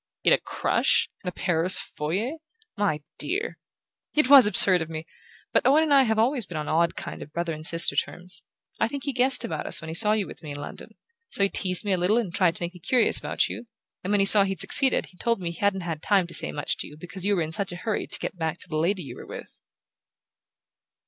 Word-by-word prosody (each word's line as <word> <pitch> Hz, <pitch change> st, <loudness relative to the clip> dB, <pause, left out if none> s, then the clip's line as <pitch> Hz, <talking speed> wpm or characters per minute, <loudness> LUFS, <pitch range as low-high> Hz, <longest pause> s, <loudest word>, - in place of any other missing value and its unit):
"In -, -, +4 dB
a -, -, +2 dB
crush -, -, 0 dB
in -, -, -9 dB
a -, -, -8 dB
Paris 175 Hz, 0 st, +1 dB
foyer? 200 Hz, -, -4 dB, 0.4 s
My 195 Hz, -8 st, -2 dB, 0.2 s
dear!" 405 Hz, +7 st, -2 dB, 0.6 s
"It 295 Hz, -3 st, +2 dB
was 270 Hz, -6 st, +9 dB
absurd 185 Hz, -3 st, +7 dB
of 160 Hz, -, -5 dB
me! 160 Hz, 0 st, -7 dB, 0.5 s
But -, -, +2 dB
Owen 295 Hz, +4 st, +4 dB
and 305 Hz, -2 st, +1 dB
I 270 Hz, -1 st, +5 dB
have 220 Hz, -1 st, -1 dB
always 235 Hz, -1 st, 0 dB
been 170 Hz, -, -7 dB
on 150 Hz, -1 st, -5 dB
odd 170 Hz, +2 st, 0 dB
kind -, -, -8 dB
of 150 Hz, -, -10 dB
brother 170 Hz, 0 st, -3 dB
and 155 Hz, 0 st, -9 dB
sister 165 Hz, +1 st, +3 dB
terms. 180 Hz, 0 st, -3 dB, 0.4 s
I 225 Hz, -, +1 dB
think 275 Hz, +3 st, -7 dB
he 280 Hz, -, -3 dB
guessed 255 Hz, +1 st, +3 dB
about 160 Hz, -2 st, -5 dB
us -, -, -1 dB
when 160 Hz, -, -9 dB
he -, -, -5 dB
saw 210 Hz, +5 st, +4 dB
you 215 Hz, -2 st, -1 dB
with -, -, -12 dB
me 155 Hz, -, -10 dB
in 145 Hz, -, -6 dB
London. 145 Hz, -, -10 dB, 0.3 s
So 200 Hz, -, -2 dB
he 200 Hz, -, +2 dB
teased 185 Hz, 0 st, -1 dB
me 200 Hz, -, -1 dB
a 185 Hz, -, +1 dB
little 180 Hz, +6 st, +1 dB
and 210 Hz, -8 st, -3 dB
tried 180 Hz, -3 st, +1 dB
to -, -, -6 dB
make 175 Hz, +1 st, -5 dB
me 180 Hz, -, -14 dB
curious 245 Hz, +7 st, +2 dB
about -, -, -1 dB
you; -, -, -8 dB, 0.4 s
and 185 Hz, -, -5 dB
when 205 Hz, 0 st, +1 dB
he -, -, +2 dB
saw 200 Hz, 0 st, +8 dB
he'd 195 Hz, -1 st, -4 dB
succeeded 270 Hz, -2 st, +3 dB
he 180 Hz, -, -21 dB
told 230 Hz, +1 st, -1 dB
me 175 Hz, -2 st, -4 dB
he 170 Hz, -, -12 dB
hadn't 200 Hz, -2 st, 0 dB
had 165 Hz, -3 st, -6 dB
time 195 Hz, -1 st, +1 dB
to 170 Hz, -, -8 dB
say -, -, +2 dB
much 145 Hz, -, -3 dB
to -, -, -2 dB
you 150 Hz, -, -14 dB
because 180 Hz, +3 st, -7 dB
you 205 Hz, +1 st, +1 dB
were 175 Hz, -, -1 dB
in 155 Hz, -, -6 dB
such 195 Hz, +3 st, -2 dB
a -, -, -7 dB
hurry 220 Hz, -, -2 dB
to -, -, +1 dB
get -, -, -5 dB
back 160 Hz, -1 st, -4 dB
to -, -, -5 dB
the 155 Hz, -3 st, -4 dB
lady 180 Hz, +4 st, -1 dB
you 140 Hz, -, -10 dB
were -, -, -11 dB
with." -, -, -11 dB
185 Hz, 260 wpm, -24 LUFS, 165-220 Hz, 0.6 s, was